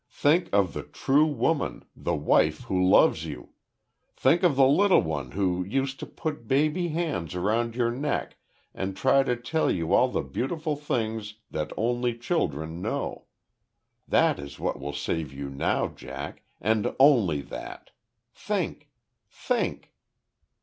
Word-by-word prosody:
Think 150 Hz, +7 st, +2 dB
of 100 Hz, -3 st, +2 dB
the -, -, -4 dB
true 145 Hz, +3 st, +2 dB
woman 145 Hz, +2 st, -1 dB
the 85 Hz, -, -2 dB
wife 75 Hz, 0 st, +2 dB
who 90 Hz, -1 st, 0 dB
loves 90 Hz, -3 st, +5 dB
you. 80 Hz, -3 st, -7 dB, 0.7 s
Think 160 Hz, +7 st, +3 dB
of 175 Hz, -7 st, +3 dB
the 135 Hz, 0 st, +6 dB
little 185 Hz, +9 st, +5 dB
one 75 Hz, -5 st, -3 dB
who 90 Hz, -2 st, 0 dB
used 135 Hz, +7 st, -2 dB
to -, -, -6 dB
put 150 Hz, -8 st, -5 dB
baby 155 Hz, +7 st, +2 dB
hands 150 Hz, -, -2 dB
around 110 Hz, +5 st, 0 dB
your 120 Hz, -1 st, +1 dB
neck 140 Hz, +4 st, -2 dB, 0.4 s
and 95 Hz, 0 st, -4 dB
try 135 Hz, +1 st, +4 dB
to 125 Hz, -2 st, 0 dB
tell 125 Hz, +7 st, 0 dB
you 85 Hz, -2 st, 0 dB
all -, -, +5 dB
the -, -, -2 dB
beautiful 150 Hz, -, -2 dB
things 110 Hz, -7 st, -3 dB, 0.2 s
that 75 Hz, -1 st, -3 dB
only 120 Hz, +1 st, 0 dB
children 80 Hz, -, -2 dB
know. -, -, -3 dB, 0.8 s
That -, -, +3 dB
is 70 Hz, 0 st, -8 dB
what -, -, -2 dB
will 70 Hz, +1 st, -4 dB
save 75 Hz, 0 st, -2 dB
you 70 Hz, 0 st, -6 dB
now, 70 Hz, -, 0 dB
Jack -, -, -8 dB, 0.2 s
and 110 Hz, 0 st, 0 dB
only 115 Hz, -, +5 dB
that! -, -, -9 dB, 0.4 s
Think.... -, -, -3 dB, 0.4 s
Think!" -, -, -2 dB
115 Hz, 145 wpm, -27 LUFS, 85-145 Hz, 0.8 s, the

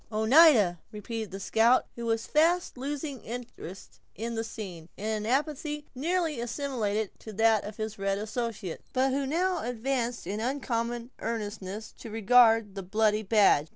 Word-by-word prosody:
"Oneida!" 220 Hz, -, +6 dB
repeated 220 Hz, +1 st, -5 dB
the 195 Hz, -, -7 dB
scout, 230 Hz, +5 st, +3 dB
who 235 Hz, -1 st, -5 dB
was 225 Hz, 0 st, 0 dB
fast 335 Hz, +4 st, +2 dB
losing 280 Hz, +1 st, -4 dB
his 235 Hz, -, -5 dB
interest 190 Hz, -5 st, -11 dB, 0.2 s
in 230 Hz, +2 st, -4 dB
the 225 Hz, 0 st, -2 dB
scene, 180 Hz, -7 st, -8 dB
in 205 Hz, -, -6 dB
an 215 Hz, -1 st, -1 dB
apathy 295 Hz, +3 st, -1 dB
nearly 320 Hz, +1 st, -1 dB
assimilated 235 Hz, -4 st, -2 dB
to 220 Hz, -, -9 dB
that 220 Hz, 0 st, +3 dB
of 210 Hz, 0 st, -8 dB
his 215 Hz, -1 st, -4 dB
red 195 Hz, 0 st, 0 dB
associates, 215 Hz, -4 st, -4 dB
but 265 Hz, +1 st, +2 dB
who 275 Hz, 0 st, 0 dB
now 355 Hz, +4 st, +1 dB
advanced 245 Hz, -1 st, -2 dB
in 200 Hz, +4 st, -3 dB
uncommon 240 Hz, -1 st, -2 dB
earnestness 210 Hz, -2 st, -5 dB
to 230 Hz, -, -8 dB
regard 225 Hz, -1 st, +5 dB
the 195 Hz, -, -5 dB
bloody 215 Hz, +3 st, +1 dB
badge. 200 Hz, -8 st, +4 dB
225 Hz, 155 wpm, -28 LUFS, 210-265 Hz, 0.2 s, Oneida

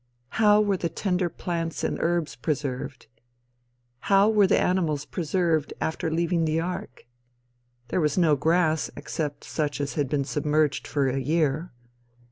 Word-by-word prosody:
How 210 Hz, -1 st, +4 dB
were 205 Hz, -2 st, +2 dB
the 170 Hz, -, -2 dB
tender 180 Hz, +1 st, -1 dB
plants 165 Hz, -1 st, -4 dB
and -, -, -1 dB
herbs 170 Hz, -2 st, 0 dB
preserved? 140 Hz, -3 st, -3 dB, 0.9 s
How 200 Hz, -, +4 dB
were 210 Hz, -3 st, +5 dB
the -, -, +3 dB
animals 160 Hz, -6 st, 0 dB
preserved 165 Hz, -2 st, 0 dB
after 160 Hz, +1 st, -2 dB
leaving 170 Hz, +1 st, +1 dB
the 155 Hz, +1 st, +1 dB
ark? 180 Hz, +2 st, -5 dB, 0.8 s
There 185 Hz, -, 0 dB
was 150 Hz, 0 st, +1 dB
no 165 Hz, -4 st, +4 dB
grass 160 Hz, +1 st, +1 dB
except 145 Hz, -3 st, -4 dB
such 150 Hz, -2 st, -2 dB
as 145 Hz, 0 st, -2 dB
had 145 Hz, -4 st, -1 dB
been 140 Hz, -1 st, 0 dB
submerged 150 Hz, +1 st, 0 dB
for 140 Hz, -2 st, +1 dB
a 130 Hz, +1 st, 0 dB
year. 155 Hz, +3 st, 0 dB
160 Hz, 145 wpm, -26 LUFS, 145-180 Hz, 0.9 s, were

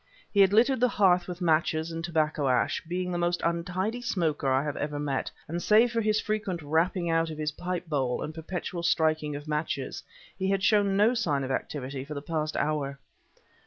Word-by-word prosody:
He 200 Hz, -, +2 dB
had 195 Hz, -1 st, +7 dB
littered 245 Hz, +5 st, +4 dB
the 250 Hz, -, +4 dB
hearth 185 Hz, -6 st, +3 dB
with 180 Hz, 0 st, -6 dB
matches 160 Hz, -1 st, +1 dB
and 165 Hz, 0 st, -5 dB
tobacco 155 Hz, -4 st, 0 dB
ash, 125 Hz, -, +1 dB
being 180 Hz, +1 st, -2 dB
the 175 Hz, -, -1 dB
most 175 Hz, 0 st, +1 dB
untidy 180 Hz, +7 st, -1 dB
smoker 160 Hz, -, 0 dB
I 130 Hz, +1 st, +2 dB
have 150 Hz, -1 st, -3 dB
ever 145 Hz, 0 st, -3 dB
met; 145 Hz, -2 st, -2 dB, 0.2 s
and 170 Hz, +3 st, -3 dB
save 225 Hz, +5 st, +5 dB
for 230 Hz, -1 st, 0 dB
his 215 Hz, 0 st, +2 dB
frequent 205 Hz, -6 st, -2 dB
rapping 170 Hz, +4 st, +1 dB
out 165 Hz, 0 st, +2 dB
of 155 Hz, -, -6 dB
his 155 Hz, 0 st, -1 dB
pipe 180 Hz, +3 st, -4 dB
bowl 135 Hz, -5 st, -1 dB
and 155 Hz, -, -5 dB
perpetual 170 Hz, +2 st, -5 dB
striking 155 Hz, -3 st, +1 dB
of 145 Hz, +1 st, -8 dB
matches, 150 Hz, -3 st, -2 dB, 0.4 s
he 190 Hz, 0 st, 0 dB
had 195 Hz, -1 st, +1 dB
shown 200 Hz, -2 st, +3 dB
no 215 Hz, +4 st, +5 dB
sign 155 Hz, -, 0 dB
of 135 Hz, -, -3 dB
activity 135 Hz, 0 st, -3 dB
for 150 Hz, +2 st, -7 dB
the 140 Hz, -, -4 dB
past 155 Hz, -1 st, -2 dB
hour. 145 Hz, -2 st, -1 dB
165 Hz, 200 wpm, -28 LUFS, 150-190 Hz, 0.4 s, had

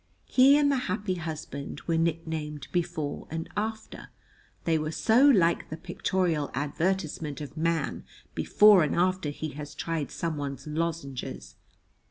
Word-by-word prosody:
He 270 Hz, +3 st, +6 dB
and 290 Hz, -1 st, +3 dB
the 275 Hz, -, +2 dB
happy 190 Hz, +1 st, -1 dB
husband 160 Hz, -4 st, -6 dB
were 165 Hz, -, +1 dB
nicknamed 160 Hz, -3 st, -2 dB
Before 170 Hz, -4 st, -2 dB
and 165 Hz, +1 st, -4 dB
After, 220 Hz, +1 st, -4 dB, 0.5 s
they 160 Hz, -2 st, +2 dB
were 155 Hz, 0 st, -2 dB
so 225 Hz, -, +4 dB
like 170 Hz, -9 st, +3 dB
the 155 Hz, -, -5 dB
pictorial 170 Hz, -3 st, -1 dB
advertisement 155 Hz, +1 st, -2 dB
of 145 Hz, 0 st, -8 dB
Man 165 Hz, -2 st, -1 dB, 0.3 s
before 210 Hz, -3 st, +6 dB
and 150 Hz, -, +1 dB
after 185 Hz, -2 st, +1 dB
he 155 Hz, +2 st, -4 dB
has 145 Hz, 0 st, -8 dB
tried 165 Hz, -3 st, -2 dB
Someone's 145 Hz, -5 st, -4 dB
lozenges. 150 Hz, -, -4 dB
165 Hz, 135 wpm, -28 LUFS, 150-185 Hz, 0.5 s, He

